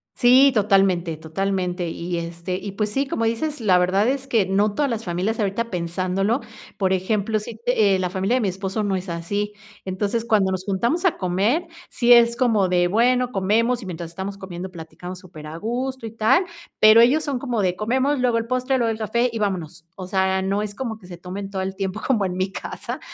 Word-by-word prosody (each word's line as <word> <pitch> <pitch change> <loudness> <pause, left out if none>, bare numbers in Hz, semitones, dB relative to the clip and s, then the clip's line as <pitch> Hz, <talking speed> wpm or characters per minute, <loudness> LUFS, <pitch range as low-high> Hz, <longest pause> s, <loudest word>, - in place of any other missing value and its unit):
Sí, 260 +3 +6
totalmente, 195 -6 +2
totalmente. 180 +2 -2
Y, 170 +1 -4
este, 170 +2 -4
y 195 +1 -6
pues 210 +1 -1
sí, 275 +4 0
como 230 - -2
dices, 255 +5 -2
la 185 -4 +4
verdad 185 +3 +2
es 270 0 -2
que 225 -7 +2
no 200 +2 +1
todas 290 -2 +1
las 230 -1 -3
familias, 185 +6 -1
ahorita 215 +3 -1
pensándolo, 185 +6 -1 0.4
por 190 -2 +1
ejemplo, 205 +3 0
sí 215 +1 -8
te 215 -5 +3
eh, 185 - -1
la 180 - -1
familia 190 +6 0
de 255 - +1
mi 205 - +1
esposo 195 +3 -3
no 200 -2 0
es 185 +1 -6
así. 200 +5 -3 0.3
Entonces, 200 +4 -2
cuando 205 -4 +2
nos 185 0 -3
juntamos 235 - 0
a 370 - +3
comer, 205 - 0 0.2
sí 240 0 +2
es 235 -1 +7
como 225 -6 +2
de, 175 -1 +2
bueno, 245 +4 +2
comemos, 230 +5 +1
y - - -8
mientras 170 -2 -6
estamos 190 +3 -6
comiendo, 190 -1 -7
platicamos 170 +2 -9
super 165 -5 -11
a 155 - -7
gusto 245 +5 -3
y 225 - -6
tal. 225 - +3 0.4
Pero 215 +1 +8
ellos 275 +7 +4
son 280 -4 -2
como 245 -5 -1
de 180 -2 +1
comemos, 260 +6 +1
luego 245 -2 +2
el 230 0 -2
postre, 255 +1 0
luego 235 -2 +1
el 220 - -4
café 235 +3 0
y 225 - -4
vámonos. 175 -5 -3
O 185 - -7
sea, 190 0 +1
no 195 +2 0
es 210 -1 -5
como 230 -3 -4
que 185 - -15
se 175 -1 -9
tomen 190 +3 -6
todo 195 -1 -3
el 190 0 -3
tiempo, 195 +2 -3
como 225 -7 +2
en 180 -1 -3
mi 185 +1 -1
casa - - -6
200 Hz, 220 wpm, -22 LUFS, 185-235 Hz, 0.4 s, Pero